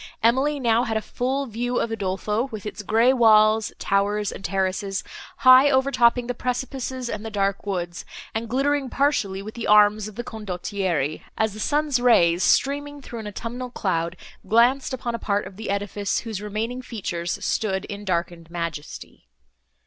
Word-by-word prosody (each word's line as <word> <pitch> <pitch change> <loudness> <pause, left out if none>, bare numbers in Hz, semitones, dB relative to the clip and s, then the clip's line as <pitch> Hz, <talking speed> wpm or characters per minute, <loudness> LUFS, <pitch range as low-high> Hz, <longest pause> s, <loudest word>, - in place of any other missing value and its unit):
Emily 270 +6 +3
now 235 -2 +3
had 220 -1 -1
a - - +1
full 260 +5 -2
view 245 +1 -2
of 230 - -1
Udolpho, 210 +2 -1
with 215 -2 -7
its 210 +1 -5
grey 225 +5 +3
walls, 220 -2 +5
towers 205 +1 0
and - - -9
terraces, 195 +1 -1 0.3
high 260 +2 +7
over 265 0 +2
topping 245 -1 +3
the 245 - -2
precipices 255 +1 -3
and 210 -2 -4
the 225 - -5
dark 200 -1 -1
woods, 175 -3 -3 0.3
and 225 +1 -3
glittering 275 +2 +1
partially 210 -10 0
with 215 +2 -8
the 235 - -5
arms 210 0 +5
of 215 - -10
the 240 - -4
Condottieri, 185 -8 -3 0.2
as 220 -2 +1
the 215 - -9
sun's 290 +2 +1
rays, 180 -8 +4
streaming 290 +5 +1
through 240 -4 -8
an 215 - -6
autumnal 235 +5 -5
cloud, 170 -6 -2 0.3
glanced 245 +5 +3
upon 245 -2 -3
a 235 - -3
part 205 -1 -1
of 190 - -10
the 220 +2 -6
edifice, 200 0 -1
whose 220 -4 -5
remaining 220 +4 -3
features 180 -8 -4
stood 190 -3 -1
in 205 0 -7
darkened 170 -3 -2
majesty. 170 -3 -6
220 Hz, 170 wpm, -24 LUFS, 195-245 Hz, 0.3 s, high